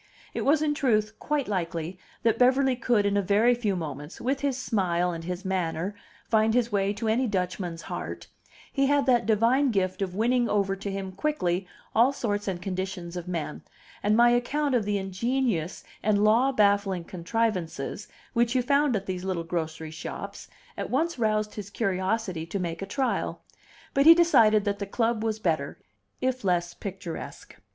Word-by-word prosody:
It - - -2
was 300 +2 +3
in 300 -1 +2
truth 215 -6 +1
quite 295 -2 -1
likely 175 -2 -3 0.2
that 230 0 +2
Beverly 260 +1 +4
could 235 -4 +2
in 200 0 +1
a 200 - +3
very 210 +5 +4
few 220 -5 -1
moments, 150 -2 -6
with 265 +3 -1
his 275 -3 -1
smile 180 -8 0
and 165 -1 -6
his 180 +2 -5
manner, 185 0 -1 0.3
find 220 0 +3
his 240 -1 +2
way 200 -1 +1
to 225 +2 -4
any 240 +4 +2
Dutchman's 180 -4 -2
heart; - - -6 0.5
he 275 -1 +2
had 285 0 +3
that 245 -4 +3
divine 235 +6 +3
gift 185 -3 0
of 185 -2 -2
winning 240 +3 +2
over 195 -2 +1
to 200 +1 -5
him 195 -1 -4
quickly 185 - -1 0.3
all 240 +4 +5
sorts 205 -6 -2
and 185 -3 -2
conditions 185 -1 -4
of 175 0 -5
men; 165 -4 -4 0.4
and 210 +1 +2
my 240 0 +6
account 280 +4 +1
of 235 -4 +2
the 205 0 0
ingenious 195 -2 -1 0.2
and 210 -1 +2
law 235 +6 +4
baffling 200 -5 +2
contrivances, 185 0 -2 0.3
which 235 +1 +2
you 255 - +3
found 280 0 +3
at 195 -1 -2
these 185 -1 -4
little 185 -3 -2
grocery 160 -2 -4
shops, 160 - -7 0.3
at - - -3
once 315 +2 0
roused 215 -1 +1
his 205 -2 -7
curiosity 195 -3 -1
to 185 - -3
make 170 -2 -3
a 195 - -4
trial; 265 +6 -1 0.5
but 275 +2 +4
he 330 - +11
decided 220 -12 +5
that 200 0 -1
the 200 - -3
club 225 +1 0
was 220 -1 0
better, 160 -8 -1 0.4
if 255 -1 -1
less 175 -2 +1
picturesque. 190 -4 -7
205 Hz, 175 wpm, -27 LUFS, 185-240 Hz, 0.5 s, he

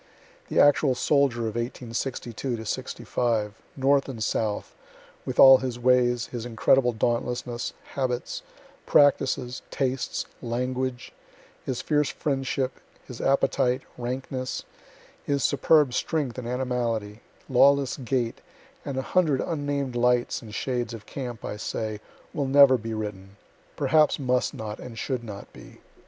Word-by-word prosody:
The - - +1
actual 145 -2 +5
soldier 140 -3 +2
of 110 -2 -2
1862 120 0 -4
'65, 110 -1 -1 0.2
North 135 +1 +3
and 115 -5 -4
South, 105 -1 -2 0.5
with - - -3
all 135 -1 +10
his 125 -2 -3
ways, 120 -1 +3
his 120 -2 -6
incredible 120 +2 +3
dauntlessness, 120 +1 -2 0.2
habits, 125 -3 -2 0.5
practices, 130 -3 +3
tastes, 130 -1 -2 0.2
language, 125 +1 -3 0.5
his 130 -2 -3
fierce 150 -2 +2
friendship, 135 -2 -2 0.3
his 125 -3 -8
appetite, 130 -1 +2
rankness, 130 +1 -4 0.6
his 140 -1 0
superb 140 -1 +4
strength 140 -6 -1
and 120 - -6
animality, 120 -4 -2 0.3
lawless 140 +1 +4
gait, 125 -3 -2 0.4
and 140 -2 -4
a 130 - -1
hundred 155 -6 +2
unnamed 145 -5 -2
lights 125 0 +2
and 110 -2 -9
shades 120 -3 -2
of 105 - -11
camp, 125 -5 -6
I 105 - -4
say, 110 0 -4 0.3
will 140 -2 -1
never 140 -1 +7
be 115 -2 -4
written 100 -2 -6 0.4
perhaps 155 -1 +3
must 125 -2 0
not 105 -1 -6
and 120 -2 -9
should 125 0 -2
not 105 -3 -9
be. - - -14
125 Hz, 125 wpm, -26 LUFS, 120-135 Hz, 0.6 s, all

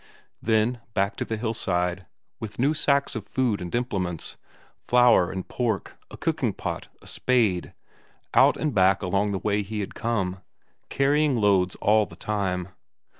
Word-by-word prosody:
Then 110 +2 +1
back 100 +2 +1
to - - -2
the 110 - -3
hillside, 95 -5 -1 0.3
with 110 -2 -7
new 140 +5 +2
sacks 140 -2 +1
of 105 -3 -5
food 125 -7 0
and 90 +3 -4
implements; 95 -9 -2 0.5
flour 120 -7 +5
and 95 -1 -5
pork, 115 -6 -2
a - - -10
cooking - - 0
pot, - - -5 0.2
a - - -16
spade 110 -9 +1 0.6
out - - +5
and 150 -3 -1
back 95 0 +3
along 100 +3 +1
the 100 - -1
way 105 +1 0
he 105 +2 -5
had 100 - -5
come, 95 -5 -2 0.5
carrying 145 +1 +2
loads 100 -4 +2
all 105 0 +3
the 85 - -13
time. 95 -3 -2
105 Hz, 155 wpm, -25 LUFS, 95-120 Hz, 0.6 s, flour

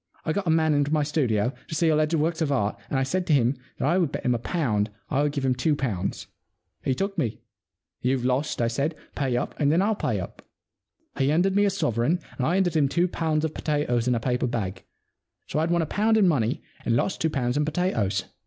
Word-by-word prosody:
I 155 - 0
got 190 0 -2
a - - +3
man 160 -1 +3
into 145 0 +1
my 155 -1 +2
studio, 125 -6 +1
to 160 - -5
see 165 +1 +3
alleged 155 +1 +2
works 160 +1 0
of 150 -3 +1
art, 105 -7 +1
and 135 - 0
I 135 - +2
said 180 +7 -1
to 155 - +3
him 130 -1 +3 0.2
that - - 0
I 175 +5 +3
would 165 -6 +1
bet - - -5
him 125 - +3
a 120 - -1
pound 115 - 0 0.2
I 140 -1 +2
would 145 0 +1
give 140 -2 -2
him 130 - +3
two 135 +5 +1
pounds. 105 -10 -2 0.6
He 130 - +1
took 195 +4 -2
me. 120 -8 -2 0.6
You've 125 0 0
lost," 130 0 0
I - - +2
said. 140 +7 -1 0.2
Pay 130 -4 0
up, - - -2
and 145 -1 +3
then 165 - +3
I'll 205 +3 +2
pay 210 - -1
up." - - -7 0.8
He 135 0 +3
handed 180 +6 +2
me 205 0 +4
a - - +4
sovereign 155 - 0 0.2
and 130 - +1
I 175 - +2
handed 185 -3 +1
him 145 -3 +3
two 175 +5 +2
pounds 160 -3 0
of 155 - -3
potatoes 135 -6 0
in 125 - +3
a - - 0
paper 125 +1 0
bag. 100 -6 -3 0.6
So - - -2
I'd 160 +2 +1
won 170 -1 +2
a - - -1
pound 220 +7 +2
in 205 -3 +5
money 125 -8 +1 0.2
and 115 - +1
lost 185 - 0
two 160 - +2
pounds 125 -4 -1
in 150 - +2
potatoes. 120 - 0
145 Hz, 245 wpm, -25 LUFS, 125-165 Hz, 0.8 s, in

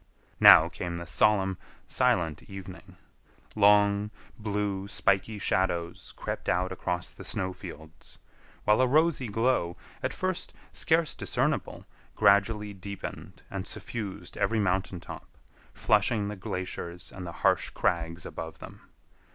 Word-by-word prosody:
Now - - +9
came 85 -1 -5
the 85 - -6
solemn, 95 +1 +2 0.3
silent 80 -3 +1
evening. 95 -1 -10 0.6
Long, 105 0 +4 0.3
blue, 105 -2 -2
spiky 100 +1 +1
shadows 85 -4 -1
crept - - -4
out 90 +3 +1
across 90 -1 -3
the - - -11
snow 95 0 -2
fields, 80 -2 -11 0.5
while 105 +4 +4
a 130 - +4
rosy 150 -1 +3
glow, 115 -5 +1 0.2
at - - -1
first 185 -1 -3 0.2
scarce 160 -1 +2
discernible, - - -1 0.3
gradually 105 +1 +3
deepened 100 0 -8
and 100 0 -4
suffused 105 -5 -6
every 115 -1 +1
mountain 95 -2 0
top, - - -11 0.3
flushing 105 0 +2
the 105 - -4
glaciers 90 -2 -5
and 90 -2 -7
the - - -5
harsh - - +3
crags 85 0 -1
above 80 0 -7
them. - - -11
100 Hz, 125 wpm, -28 LUFS, 90-105 Hz, 0.6 s, Now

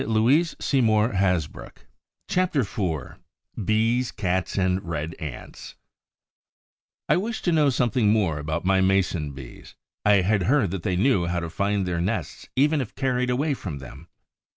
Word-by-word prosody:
CHAPTER 180 -6 +1
IV 95 - -3 0.5
BEES, 115 +5 +1
CATS 95 -2 -2
AND 95 0 +1
RED 80 -2 -4
ANTS 75 -5 -8 1.3
I - - +3
wished 220 +4 -3
to 175 - +3
know 155 -3 +4
something 120 -4 +1
more 95 -9 +1
about 80 +4 -3
my 95 0 +3
Mason 95 -6 +1
bees. 65 -3 -12 0.3
I 105 -2 +5
had 100 +2 +1
heard 130 - +2
that 95 -2 -4
they 90 - -1
knew 95 -3 +2
how 85 0 -1
to 85 -1 -5
find 100 +2 0
their 85 -2 -1
nests 100 +6 -3
even 150 +2 +3
if 125 -2 -7
carried 125 -2 0
away 140 +4 +1
from 90 - -6
them. 70 +4 -11
95 Hz, 140 wpm, -24 LUFS, 85-125 Hz, 1.3 s, I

